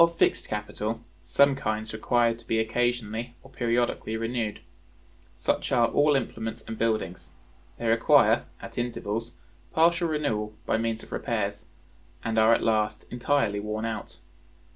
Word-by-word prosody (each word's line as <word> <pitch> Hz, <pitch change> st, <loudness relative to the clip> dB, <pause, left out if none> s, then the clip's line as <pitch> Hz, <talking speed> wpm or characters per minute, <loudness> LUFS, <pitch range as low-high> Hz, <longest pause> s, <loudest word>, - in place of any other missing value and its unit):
Of 170 Hz, 0 st, +2 dB
fixed -, -, +2 dB
capital, 105 Hz, +1 st, -3 dB, 0.2 s
some 135 Hz, +12 st, +4 dB
kinds 110 Hz, -4 st, -3 dB
require 115 Hz, +1 st, +2 dB
to 115 Hz, 0 st, -14 dB
be 110 Hz, -, +1 dB
occasionally 120 Hz, 0 st, -1 dB
or 135 Hz, -, -15 dB
periodically 120 Hz, -2 st, 0 dB
renewed. 115 Hz, -2 st, -2 dB, 0.8 s
Such 85 Hz, -, -1 dB
are 120 Hz, -3 st, +4 dB
all 145 Hz, 0 st, +4 dB
implements 115 Hz, -3 st, -3 dB
and 110 Hz, -, -6 dB
buildings: 95 Hz, -7 st, -2 dB, 0.4 s
they 120 Hz, -, -5 dB
require, 115 Hz, +1 st, +5 dB
at -, -, -7 dB
intervals, 115 Hz, -1 st, -3 dB, 0.4 s
partial 170 Hz, +1 st, +4 dB
renewal 110 Hz, -9 st, -1 dB
by -, -, +1 dB
means 115 Hz, 0 st, -2 dB
of -, -, -14 dB
repairs, 105 Hz, -3 st, -2 dB, 0.6 s
and 110 Hz, -1 st, +1 dB
are 110 Hz, +1 st, +6 dB
at 115 Hz, -, +3 dB
last 110 Hz, -1 st, +1 dB
entirely 120 Hz, -4 st, +1 dB
worn 105 Hz, +1 st, -3 dB
out. 115 Hz, -1 st, -5 dB
115 Hz, 140 wpm, -27 LUFS, 110-120 Hz, 0.8 s, are